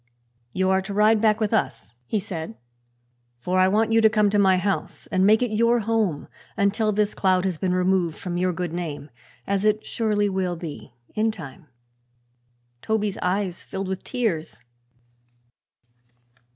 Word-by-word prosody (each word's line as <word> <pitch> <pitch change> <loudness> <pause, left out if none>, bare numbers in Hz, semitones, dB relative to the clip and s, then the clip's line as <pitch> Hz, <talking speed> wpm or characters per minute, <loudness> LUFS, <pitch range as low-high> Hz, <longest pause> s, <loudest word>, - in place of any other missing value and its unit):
"You 190 +4 +1
are 190 0 +3
to 195 +1 -6
ride 215 +1 +4
back 215 -1 +3
with 215 0 0
us," 115 - -1
he 215 - 0
said, 165 - -6 0.8
"for 180 +10 -1
I 185 - +5
want 215 +3 +2
you 225 0 +4
to 220 - +6
come 210 -2 +2
to 205 - +2
my 190 -2 +4
house 195 +2 -2
and 190 +1 +3
make 220 +3 +5
it 245 - -1
your 230 +2 +3
home 215 -8 -1 0.3
until 210 +2 +1
this 210 0 0
cloud 185 -1 +2
has 180 -5 -2
been 180 -1 0
removed 180 -3 +1
from 180 -2 -5
your 180 +1 +1
good 175 -1 -4
name 155 -4 -5 0.3
as 200 0 -1
it 215 0 +1
surely 210 -2 0
will 190 -2 -1
be, 155 -7 -9 0.2
in 220 +1 +1
time." 155 -6 -11 1.1
Toby's 210 -2 -1
eyes 185 -1 -1
filled 195 -1 -5
with 190 0 -4
tears. 205 -11 -3
195 Hz, 165 wpm, -24 LUFS, 180-215 Hz, 1.1 s, to